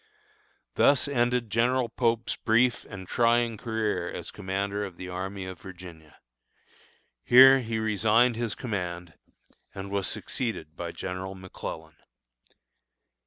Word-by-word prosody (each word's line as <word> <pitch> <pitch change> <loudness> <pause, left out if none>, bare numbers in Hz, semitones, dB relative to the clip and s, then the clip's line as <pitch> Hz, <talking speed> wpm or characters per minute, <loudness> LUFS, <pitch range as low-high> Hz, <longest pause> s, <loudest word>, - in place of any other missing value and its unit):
Thus 140 - +4
ended 120 -4 0
General 125 +3 +2
Pope's 115 0 0
brief 120 +2 +2
and 95 -3 -9
trying 120 0 +2
career 110 -1 -2
as - - -6
commander 100 +2 -3
of 95 -4 -7
the 90 - -7
Army 95 +1 -5
of 95 -1 -8
Virginia. 90 -5 -12 1.1
Here 135 +2 +8
he 115 -3 -3
resigned 110 +2 +3
his 115 -2 -2
command, 90 -7 -4 0.6
and 100 0 -6
was 100 -1 0
succeeded 85 - -3
by 85 -1 -5
General 95 +2 -5
McClellan. 80 -4 -8
105 Hz, 120 wpm, -27 LUFS, 95-120 Hz, 1.1 s, Here